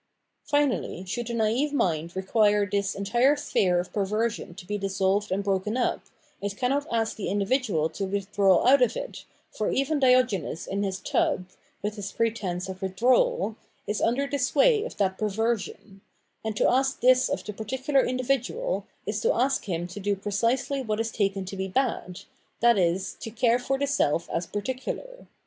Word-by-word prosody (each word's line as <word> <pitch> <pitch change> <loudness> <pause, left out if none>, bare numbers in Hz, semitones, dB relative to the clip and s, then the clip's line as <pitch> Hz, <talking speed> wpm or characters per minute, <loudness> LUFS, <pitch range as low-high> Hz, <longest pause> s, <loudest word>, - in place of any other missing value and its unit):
Finally, 285 - 0
should 240 +5 -3
the 235 - -3
naive 230 +6 +1
mind 170 - 0
require 205 +1 +2
this 200 -1 -1
entire 240 +8 +3
sphere 185 -11 +1
of 175 - -5
perversion 210 -2 -1
to 185 - -10
be 210 - -3
dissolved 195 0 0
and 195 +2 0
broken 200 +3 0
up, 250 - 0 0.4
it 200 0 -4
cannot 275 +3 0
ask 225 -1 0
the 210 - -4
individual 200 - +1
to 195 +5 -4
withdraw 195 -1 +2
out 265 +2 +6
of 250 - +2
it, - - -7 0.3
for 215 - -2
even 280 +3 +1
Diogenes 250 - +2
in 200 +1 -2
his 195 -1 -2
tub 185 - 0 0.4
[with 210 +1 -3
his 200 -1 -5
pretence 200 -6 -1
of 190 0 -7
withdrawal] 245 - +2 0.3
is 210 - -2
under 245 +5 +2
the 280 0 -2
sway 310 - +3
of - - -8
that 190 -2 0
perversion; 215 -2 -2 0.4
and 220 -1 -3
to - - +3
ask 265 +1 +1
this 255 +1 +5
of 285 - -2
the 210 - -6
particular 265 +6 0
individual 270 - -1 0.2
is - - -2
to 475 - +3
ask 270 - +1
him 175 -3 -2
to 180 +3 -8
do 205 0 0
pre 200 +1 -6
cisely 255 +6 0
what 215 -2 -2
is 225 0 -1
taken 195 -3 -1
to 190 - -6
be 190 0 -3
bad, 190 -5 -1 0.4
viz. 190 -6 +2
to - - -6
care 235 +2 +2
for 270 +2 -1
the 280 - 0
self 170 - +1
as 170 +1 -2
particular. 260 - -5
215 Hz, 175 wpm, -26 LUFS, 195-255 Hz, 0.4 s, out